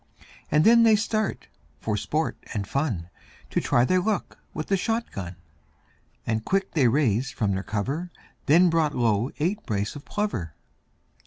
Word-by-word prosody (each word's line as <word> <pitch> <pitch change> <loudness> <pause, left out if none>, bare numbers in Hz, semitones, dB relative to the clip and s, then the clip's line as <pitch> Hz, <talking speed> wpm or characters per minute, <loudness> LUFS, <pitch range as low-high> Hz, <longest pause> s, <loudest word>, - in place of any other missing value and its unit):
And 150 +1 +4
then 235 +1 +7
they 225 -2 +6
start 215 0 -1 0.3
for 105 - -1
sport 155 +9 -1 0.2
and 100 -2 -2
fun, 110 - -2 0.4
To - - +1
try 120 - +3
their 185 +6 +2
luck 210 0 -2
with 155 - -4
the 195 - +1
shot 225 +4 -1
gun, 90 -2 -6 0.9
And 110 -1 -1
quick 195 +5 0
they 140 -6 +3
raised 125 -1 +1
from 105 -3 0
their 95 0 -1
cover, 135 - -3 0.4
Then 170 +4 +6
brought 160 -3 +1
low 115 0 +1
eight 185 +8 -1
brace 105 +2 -2
of 145 - -8
plover. 150 - -3
145 Hz, 160 wpm, -25 LUFS, -, 0.9 s, then